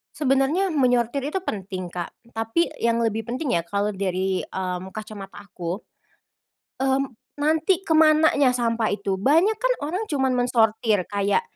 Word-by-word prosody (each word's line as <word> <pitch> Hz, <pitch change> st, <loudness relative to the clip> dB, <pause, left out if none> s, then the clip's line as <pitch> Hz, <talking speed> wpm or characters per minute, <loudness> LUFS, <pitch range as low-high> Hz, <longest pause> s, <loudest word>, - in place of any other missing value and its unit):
Sebenarnya, 280 Hz, +6 st, +2 dB
menyortir 255 Hz, -4 st, +1 dB
itu 300 Hz, +7 st, -2 dB
penting, 190 Hz, -, -5 dB
Kak, 175 Hz, 0 st, -5 dB, 0.2 s
tapi 225 Hz, +10 st, +1 dB, 0.2 s
yang 230 Hz, 0 st, +2 dB
lebih 225 Hz, -1 st, 0 dB
penting 250 Hz, -, -2 dB
ya, 170 Hz, -, 0 dB
kalau 200 Hz, +3 st, -2 dB
dari, 190 Hz, 0 st, -1 dB
mmm, 185 Hz, 0 st, -4 dB
kacamata 210 Hz, -2 st, -8 dB
aku, 175 Hz, 0 st, -5 dB, 1.0 s
mmm, 270 Hz, 0 st, +1 dB, 0.3 s
nanti, 320 Hz, +5 st, +2 dB
ke 385 Hz, -, -13 dB
mananya 310 Hz, -4 st, +5 dB
sampah 230 Hz, -2 st, 0 dB
itu. 195 Hz, -2 st, -2 dB
Banyak 330 Hz, -, +3 dB
kan -, -, +2 dB
orang 360 Hz, +9 st, -2 dB
cuman 270 Hz, -7 st, 0 dB
mensortir, 225 Hz, -4 st, +2 dB
kayak 200 Hz, -, +1 dB
235 Hz, 140 wpm, -24 LUFS, 200-295 Hz, 1.0 s, mananya